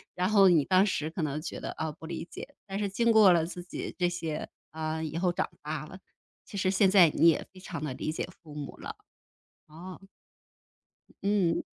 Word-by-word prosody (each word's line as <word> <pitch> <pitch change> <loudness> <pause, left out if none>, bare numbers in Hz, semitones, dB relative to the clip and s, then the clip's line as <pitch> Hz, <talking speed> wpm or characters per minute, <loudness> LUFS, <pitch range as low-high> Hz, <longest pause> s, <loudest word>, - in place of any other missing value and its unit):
然 180 +2 0
后 200 -2 +6
你 165 -5 +5
当 185 +6 +4
时 155 -6 -1
可 165 +1 -5
能 150 0 -2
觉 - - -6
得， - - -5
啊， 160 -1 -3
不 160 +1 -12
理 170 0 -5
解， 285 - -9
但 195 0 -4
是 205 - 0
经 230 +4 +2
过 215 -4 +7
了 165 -2 +2
自 175 +1 -7
己 175 - -6
这 180 -1 +2
些 165 -3 -4 0.2
啊， 160 0 -3
以 160 +1 -4
后 180 0 +1
长 - - -1
大 150 0 -4
了， 185 +4 -11 0.5
其 200 - -8
实 185 0 +1
现 195 0 +4
在 185 -4 +7
你 165 - +4
也 165 - +3
非 185 - -13
常 165 -4 -6
地 145 -4 -3
理 155 - -3
解 - - -3
父 150 -3 -12
母 145 -2 -7
了。 - - -7 0.7
哦。 175 +4 -10 1.2
嗯。 195 -5 +2
175 Hz, 225 characters per minute, -29 LUFS, 155-190 Hz, 1.2 s, 过